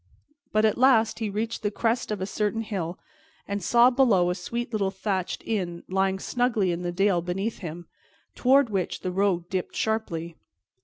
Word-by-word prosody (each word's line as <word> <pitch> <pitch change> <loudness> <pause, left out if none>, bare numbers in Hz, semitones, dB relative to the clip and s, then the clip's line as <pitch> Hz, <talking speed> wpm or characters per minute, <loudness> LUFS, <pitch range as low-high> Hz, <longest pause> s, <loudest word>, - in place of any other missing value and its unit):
But 215 +1 +3
at 215 - +1
last 230 -4 +4
he 220 -2 -1
reached 220 +3 -3
the 210 - 0
crest 230 +3 -1
of 210 -3 -3
a - - 0
certain 210 +2 -1
hill, 185 -5 -4 0.5
and 200 0 -2
saw 240 +6 +5
below 215 -9 +3
a - - +1
sweet 235 +6 -5
little 200 -3 +1
thatched 190 -1 -3
inn 180 -6 -2
lying 190 0 +1
snugly 225 -3 0
in 170 0 -3
the 175 0 -2
dale 190 0 +2
beneath 195 +6 -3
him, 170 0 -7 0.5
toward 265 -1 +4
which 190 -3 -2
the 185 - -2
road 180 -2 +1
dipped 185 -1 -3
sharply. 170 -7 -2
200 Hz, 175 wpm, -26 LUFS, 180-225 Hz, 0.5 s, saw